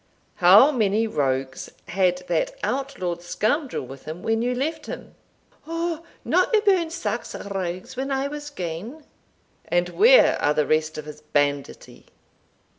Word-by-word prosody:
How 195 +11 +7
many 220 -4 +1
rogues 135 -9 -2 0.2
had 180 -1 +1
that - - -1
outlawed 185 -11 -2
scoundrel 225 - -1
with 135 +1 -11
him 160 +3 -7
when 225 0 +1
you 250 +1 0
left 295 +6 -3
him?" - - -8 0.6
"Ou, 330 -1 -2 0.2
no - - +3
aboon 385 -6 +2
sax 330 - -4
rogues 185 +1 -5
when 265 +2 -3
I 270 0 0
was 295 0 -7
gane." 200 - -6 0.6
"And 175 0 0
where 475 - +5
are 150 - +2
the 150 - +2
rest 155 +1 0
of 155 - -6
his 150 0 -10
banditti?" 145 -2 -2
200 Hz, 140 wpm, -24 LUFS, -, 0.6 s, How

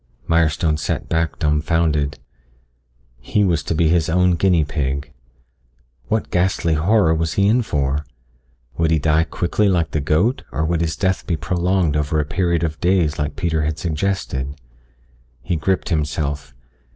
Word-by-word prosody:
Mirestone 80 -1 +2
sat - - -3
back 80 -2 0
dumbfounded. 75 -1 +1 1.0
He 105 +12 0
was 85 -5 +1
to 75 - -3
be 80 0 +3
his 85 -1 +2
own 90 +2 +3
guinea 85 -1 +3
pig. 70 0 -3 1.0
What 110 0 -1
ghastly 90 -2 +1
horror 85 +2 +3
was 80 0 -1
he 100 - +2
in 120 +4 +3
for? 70 - -1 0.8
Would 80 -1 +2
he 80 - +3
die 80 +2 +2
quickly 100 +5 0
like 85 -4 +1
the 75 - -1
goat 80 - +1
or 75 +5 -1
would 85 0 0
his 80 -1 -1
death 95 -1 -1
be 85 - 0
prolonged 85 0 0
over 75 +1 0
a 75 - 0
period 85 +1 0
of 80 -1 -3
days 90 -5 +1
like 75 0 -2
Peter 80 -2 -1
had 75 +1 -1
suggested. 75 -5 -2 0.8
He 75 - -1
gripped 90 +4 -1
himself. 75 -4 -2
80 Hz, 155 wpm, -20 LUFS, 75-90 Hz, 1.0 s, be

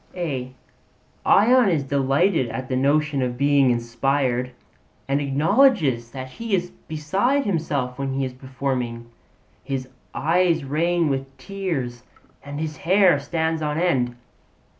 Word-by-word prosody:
Ion 245 0 +5
is 160 -6 +1
delighted 140 +2 +1
at 130 +3 -5
the 130 - 0
notion 145 +2 +1
of 125 -1 -2
being 140 -1 +4
inspired, 125 +1 0 0.6
and 140 +1 +1
acknowledges 145 - +2
that 130 +1 -7
he 215 - -2
is 180 -1 -3 0.2
beside 195 - 0
himself 145 -9 -2
when 135 -1 -2
he 135 0 -1
is 130 - -5
performing; 130 -3 -4 0.5
his 135 -2 -4 0.3
eyes 165 0 +2
rain 150 -2 0
tears 165 -12 -4 0.4
and 145 +1 -6
his 155 -2 -4
hair 185 -2 +4
stands 160 +2 -1
on 150 0 -1
end. 130 -9 +1
140 Hz, 120 wpm, -23 LUFS, 130-170 Hz, 0.6 s, Ion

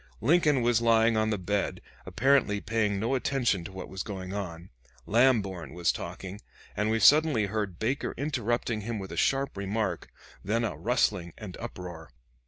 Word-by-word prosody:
Lincoln 150 0 +3
was 120 -1 +3
lying 115 -1 +4
on 110 0 +2
the 105 - 0
bed, 100 +2 -1 0.3
apparently 130 -5 +2
paying 105 -2 0
no 115 +5 0
attention 125 -7 +1
to - - -7
what 95 0 -7
was 95 0 -6
going 95 -3 -6
on. 90 -3 -6 0.3
Lamborn 100 - +2
was 85 -1 +2
talking, 95 +3 -7 0.3
and 105 +2 0
we 110 0 +1
suddenly 145 -5 +5
heard 100 -3 -3
Baker 125 +5 -2
interrupting 120 -5 -1
him 115 +2 -4
with 95 -2 -7
a - - -5
sharp 135 0 +1
remark, 100 -2 -2 0.3
then 115 +4 0
a 115 - -2
rustling 100 -8 0
and 100 -5 -8
uproar. 90 -8 -8
110 Hz, 165 wpm, -28 LUFS, 95-120 Hz, 0.3 s, suddenly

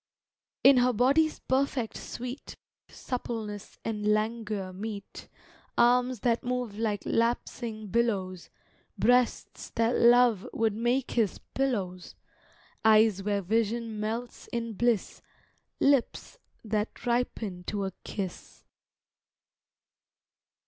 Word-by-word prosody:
In 270 -1 +8
her 250 0 +4
body's 280 +7 +3
perfect 260 -3 0
sweet 250 +3 -7 0.3
Suppleness 220 -5 -5
and 210 -2 -2
languor 215 -3 -1
meet, 205 +1 -7 0.5
Arms 245 -1 +3
that 235 -2 +1
move 245 -4 -3
like 210 -3 -1
lapsing 230 -1 -1
billows, 195 -6 -1 0.5
Breasts 245 0 +1
that 230 +1 +2
Love 235 -4 +5
would 225 -2 +1
make 240 +4 0
his 225 -5 +1 0.2
pillows, 200 -10 -2 0.7
Eyes 215 -2 +5
where 200 0 -1
vision 225 +2 -1
melts 225 +3 -4
in 230 -1 -3
bliss, 235 -1 0 0.6
Lips 280 - +1 0.3
that 215 0 -2
ripen 230 -6 -1
to 200 -1 -2
a 190 - -3
kiss. 190 -4 -6
230 Hz, 100 wpm, -28 LUFS, 210-245 Hz, 0.7 s, In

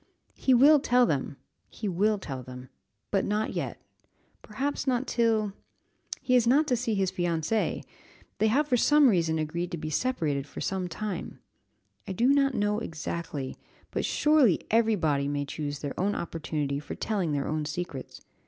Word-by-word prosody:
"He 260 - +3
will 290 +5 +7
tell 250 -2 +4
them, 140 - -2 0.3
he 215 - -5
will 205 +4 +2
tell 135 -9 -6
them 125 0 -10 0.4
but 195 - +2
not 210 +1 -1
yet; - - -4 0.6
perhaps 275 +7 -3
not 255 0 +1
till 225 -5 +1 0.7
he 255 - +1
is 240 -2 +4
not 285 +6 +5
to 250 - +3
see 230 -2 -1
his 190 -2 +1
fiancée 175 +4 -1 0.6
they 220 - +4
have 280 +7 +2
for 250 -4 +2
some 295 +2 +5
reason 165 -5 +2
agreed 170 +3 -2
to 175 - -4
be 155 0 -5
separated 150 - -1
for - - -9
some 190 -2 -2
time 185 +2 -5 0.7
I 190 - -3
do 240 +7 +2
not 275 -1 +3
know 205 +1 +1
exactly, 160 - -5 0.3
but - - -2
surely 300 - +3
every 225 0 +4
body 145 -6 0
may 145 0 -1
choose 145 0 -4
their 140 -1 -5
own 200 +3 +1
opportunity 150 -4 -3
for 145 - -7
telling 190 -8 -1
their 140 -1 -1
own 155 0 -1
secrets. 150 -3 -6
190 Hz, 170 wpm, -28 LUFS, 155-235 Hz, 0.7 s, will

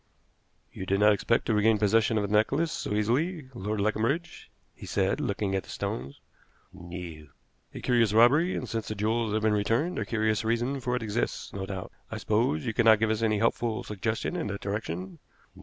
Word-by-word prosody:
"You 95 - -6
did 100 0 +1
not 105 0 +6
expect 115 +3 +1
to 115 - +1
regain 105 +1 +4
possession 110 +2 +3
of 105 - +1
the 105 - 0
necklace 140 +10 +2
so 105 - -3
easily, 130 - 0
Lord 105 -2 -3
Leconbridge," 115 - -1 0.2
he - - -11
said, - - 0
looking 100 -1 -1
at 95 - +1
the - - -18
stones. 70 +3 -4 0.5
"No." 85 -4 -8 0.5
"A - - -6
curious 120 -4 +3
robbery, 135 - +5
and, 125 - -4
since 115 -1 -3
the 110 - -3
jewels 110 +2 0
have 110 0 0
been 110 -1 +3
returned, 115 +12 0
a - - -2
curious 110 -1 0
reason 120 +5 0
for 125 0 -1
it 125 - -2
exists, 110 +2 -2
no 95 -1 -4
doubt. 95 -2 -6 0.2
I - - -5
suppose 75 +1 0
you 110 - -1
cannot 110 -1 +6
give 110 +1 +1
us 110 0 -1
any 110 -2 +2
helpful 115 +1 0
suggestion 105 +2 -3
in - - -2
that 100 0 -5
direction?" 95 -3 -4
110 Hz, 195 wpm, -28 LUFS, 100-115 Hz, 0.5 s, not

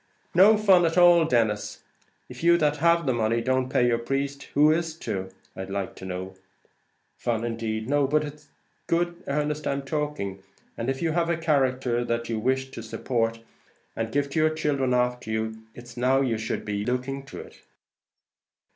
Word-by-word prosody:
"No 200 +5 +7
fun 195 -4 +5
at 165 - -2
all, 175 -2 +7
Denis. 110 -7 0 0.4
If - - -10
you 170 0 +6
that 150 -2 +1
have 170 0 +3
the 130 - +2
money 115 0 +1
don't 130 +2 0
pay 130 -3 +2
your 120 -1 +2
priest, 140 +3 -3
who 150 +2 +6
is 165 0 -1
to, 95 -9 -4 0.3
I'd 95 0 -6
like 100 -1 -3
to - - -9
know. 95 +1 -5 0.8
Fun 115 -2 -1
indeed! 115 -1 -3
no, 145 0 +2
but 150 +2 +2
it's 150 0 -9 0.4
good 175 0 0
earnest 150 +1 -1
I'm 140 0 -1
talking; 140 -10 -3 0.3
and 115 +3 -3
if 135 +4 -2
you 165 - +1
have 170 +1 0
a 170 - +1
character 130 -6 +1
that 115 0 -2
you 115 -1 -1
wish 130 +3 0
to 115 - -7
support, 115 0 -2 0.5
and 115 0 -3
to 145 +3 +2
give 140 0 -10
your 155 0 +4
children 140 -5 0
after 125 -2 0
you, 110 0 -3
it's 120 0 -12
now 130 +2 +2
you 120 -5 0
should 110 - -3
be 105 -1 -2
looking 130 +3 -2
to - - -9
it." - - -12
130 Hz, 180 wpm, -26 LUFS, 115-150 Hz, 0.8 s, No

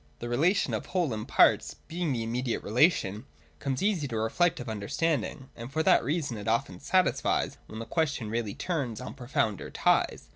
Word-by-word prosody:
The 120 - -6
relation 165 +12 +2
of - - -3
whole 175 -9 0
and 110 0 -5
parts, - - +4
being 170 -2 -2
the 120 -3 -1
immediate 120 +1 -2
relation, 110 - +2 0.3
comes 135 +2 -2
easy 190 -8 +1
to 115 -4 -3
reflective 125 +6 +1
understanding; 130 +6 -2
and 120 +2 -8
for 160 +2 0
that - - +5
reason 145 -3 -1
it 105 - -7
often 110 -5 0
satisfies 185 - +1
when 110 - -9
the 115 - -5
question 145 -7 -1
really 115 -3 -2
turns 140 -11 -2
on 125 - -7
profounder 120 -6 -1
ties. - - +1
125 Hz, 175 wpm, -29 LUFS, 115-160 Hz, 0.3 s, that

